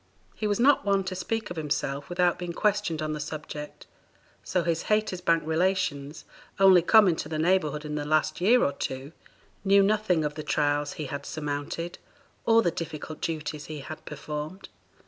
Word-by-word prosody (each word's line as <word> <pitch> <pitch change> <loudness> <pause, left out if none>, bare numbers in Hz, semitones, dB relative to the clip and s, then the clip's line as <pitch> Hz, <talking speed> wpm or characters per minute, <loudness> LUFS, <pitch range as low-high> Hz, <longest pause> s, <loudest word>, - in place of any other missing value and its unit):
He 215 - -2
was 205 +1 0
not 275 +3 +5
one 200 -1 +2
to 190 0 -4
speak 220 +2 -3
of 175 - -6
himself 145 -2 -2
without 175 0 +1
being 175 -1 -4
questioned 205 -5 0
on 155 0 -2
the 150 - -4
subject, 150 0 -7 0.6
so 180 - 0
his 165 -1 -1
Haytersbank 180 -6 +1
relations, 160 -4 -1 0.3
only 190 -2 +7
come 215 +4 +6
into 160 -4 0
the 155 - -2
neighborhood 155 -3 +1
in 150 - -4
the 150 -1 -2
last 155 +2 +1
year 240 +7 +5
or - - +2
two, 135 +1 -5 0.5
knew 200 0 +5
nothing 195 -6 +2
of 150 - -2
the 155 - -6
trials 145 -1 0
he 155 - -5
had 140 +1 -5
surmounted, 150 +3 -4 0.5
or 230 0 +6
the 175 - +2
difficult 155 -1 -6
duties 150 -2 -3
he 155 -2 -7
had 155 +3 -8
performed. 150 +5 -6
160 Hz, 175 wpm, -27 LUFS, 150-190 Hz, 0.6 s, only